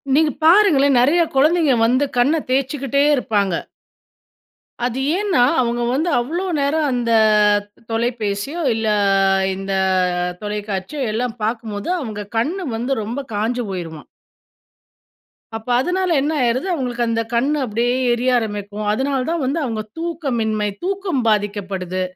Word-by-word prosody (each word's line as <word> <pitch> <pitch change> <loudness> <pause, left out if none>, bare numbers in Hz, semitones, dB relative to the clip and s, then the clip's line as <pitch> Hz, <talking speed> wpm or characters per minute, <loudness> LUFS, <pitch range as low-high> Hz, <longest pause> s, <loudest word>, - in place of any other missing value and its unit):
நீங்க 310 0 +3
பாருங்களேன்! 315 -7 +5
நிறைய 290 +8 +4
குழந்தைங்க 305 0 +3
வந்து 255 +5 +2
கண்ண 285 +7 +3
தேய்ச்சுகிட்டே 275 +1 0
இருப்பாங்க. 205 -7 0 1.3
அது 250 +1 -2 0.2
ஏன்னா, 400 -6 0 0.2
அவுங்க 240 -1 0
வந்து 315 +6 0
அவ்ளோ 310 +10 -2
நேரம் 295 +2 +1
அந்த 240 -2 -1 0.8
தொலைபேசியோ! 225 +4 -2
இல்ல 225 0 -2 0.7
இந்த 195 +1 -5 0.7
தொலைக்காட்சியோ 210 +4 -4
எல்லாம் 235 +1 -2
பார்க்கும்போது 220 +1 -3
அவுங்க 215 -6 -5
கண் 240 +10 +1 0.2
வந்து 245 +4 -2
ரொம்ப 235 +6 -4
காய்ஞ்சு 235 +4 -1
போயிருமாம். 165 -5 -6 1.5
அப்ப 225 +1 -7
அதுனால 365 +6 0
என்ன 295 +3 0
ஆயிருது, 245 +7 0
அவுங்களுக்கு 245 -7 -1
அந்த 230 0 0
கண் 245 +5 +2
அப்பிடியே 240 +1 0 0.2
எரிய 245 +2 0
ஆரம்பிக்கும். 205 -2 -4
அதுனால 270 +5 0
தான் 335 -3 -1
வந்து 280 +6 -1
அவுங்க 225 -5 -2 0.2
தூக்கமின்மை, 240 -11 -1 0.2
தூக்கம் 380 -6 -1
பாதிக்கப்படுது. 200 -3 -1
245 Hz, 120 wpm, -20 LUFS, 215-285 Hz, 1.5 s, பாருங்களேன்